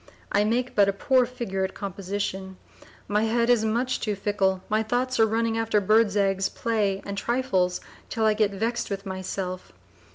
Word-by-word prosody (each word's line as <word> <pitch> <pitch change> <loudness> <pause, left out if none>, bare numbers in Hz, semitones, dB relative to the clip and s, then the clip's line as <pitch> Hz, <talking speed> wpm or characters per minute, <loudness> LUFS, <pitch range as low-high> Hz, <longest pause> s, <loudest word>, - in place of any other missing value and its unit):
I 205 - +3
make 245 +3 0
but 200 -1 +4
a - - 0
poor 255 +4 +2
figure 230 -7 -3
at 190 - -3
composition, 190 -1 -4 0.5
my 210 +2 +1
head 235 +2 +2
is 235 -3 +3
much 240 +4 0
too 210 -2 -2
fickle, 195 -2 0
my 215 +1 +1
thoughts 245 +3 -1
are 225 - +6
running 225 +1 0
after 225 -2 +2
birds' 215 +1 +3
eggs, 195 -1 +1
play 210 -4 -1
and 200 - -4
trifles 200 -6 0 0.3
till 225 -1 0
I 215 - +4
get 210 -1 +2
vexed 225 +4 -2
with 200 0 -4
myself. 185 -1 -5
210 Hz, 175 wpm, -25 LUFS, 195-230 Hz, 0.5 s, are